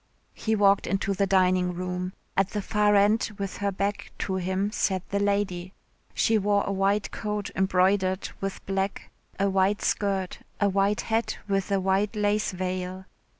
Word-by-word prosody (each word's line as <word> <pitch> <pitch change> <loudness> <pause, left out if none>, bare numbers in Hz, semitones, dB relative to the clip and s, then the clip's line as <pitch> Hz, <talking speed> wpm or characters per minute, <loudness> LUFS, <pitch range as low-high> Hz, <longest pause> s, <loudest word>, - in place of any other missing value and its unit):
He 220 0 -1
walked 200 -1 +4
into 195 0 0
the 195 0 +1
dining 185 -1 +3
room. 180 +1 -3 0.2
At 195 0 +2
the 210 - -3
far 210 0 +2
end 205 +3 +3
with 195 -1 -4
her 200 0 -1
back 200 +1 -3
to 190 -1 -1
him 190 +2 -1
sat 190 -4 -1
the 200 - 0
lady. 200 -2 -1 0.4
She 220 -1 +3
wore 205 0 +2
a - - -2
white 195 +1 +1
coat 210 -2 -3
embroidered 190 0 +2
with 195 0 -4
black, 195 0 -2 0.3
a 200 - +3
white 195 +1 +2
skirt, 195 -2 -1 0.2
a 205 - +3
white 195 +2 +1
hat 225 +1 -1
with 195 0 -1
a 195 - +3
white 195 +3 +1
lace 210 0 +1
veil. 185 0 -4
195 Hz, 165 wpm, -26 LUFS, 190-205 Hz, 0.4 s, walked